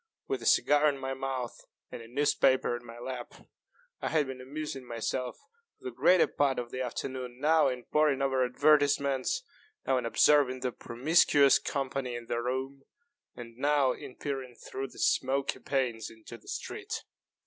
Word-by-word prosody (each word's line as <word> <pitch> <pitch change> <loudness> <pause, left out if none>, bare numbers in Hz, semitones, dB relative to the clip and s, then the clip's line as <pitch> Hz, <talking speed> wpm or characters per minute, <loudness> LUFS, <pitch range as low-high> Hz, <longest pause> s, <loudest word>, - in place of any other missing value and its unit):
With 130 -2 -2
a 115 - -3
cigar 145 +1 +5
in 140 - -3
my 135 0 -4
mouth 130 -2 -4 0.3
and - - -7
a 115 - -11
newspaper 130 -1 +2
in 120 - -8
my 115 -1 -11
lap, 125 0 -6 0.7
I - - -1
had 155 -2 +2
been 130 -1 -7
amusing 140 0 -6
myself 120 +1 -3 0.4
for - - -27
the 380 - -3
greater 180 - +4
part 140 -2 0
of 120 -1 -4
the 130 - -4
afternoon, 125 0 -4
now 155 +1 +4
in 125 -2 -3
poring 150 -3 +2
over 135 -1 +1
advertisements, 140 - +2 0.4
now 130 - +2
in 120 - -3
observing 130 0 +4
the 125 -1 -1
promiscuous 140 +3 +4
company 135 -2 -3
in 120 0 -7
the 120 0 -2
room, 130 +3 -3 0.5
and 115 -1 -10
now 140 -1 +3
in 125 - -8
peering 135 -4 -5
through 135 +3 -6
the - - -17
smoky 135 +1 +1
panes 125 -5 -1
into 110 +1 -12
the 115 - -17
street. - - -5
130 Hz, 170 wpm, -30 LUFS, 125-140 Hz, 0.7 s, cigar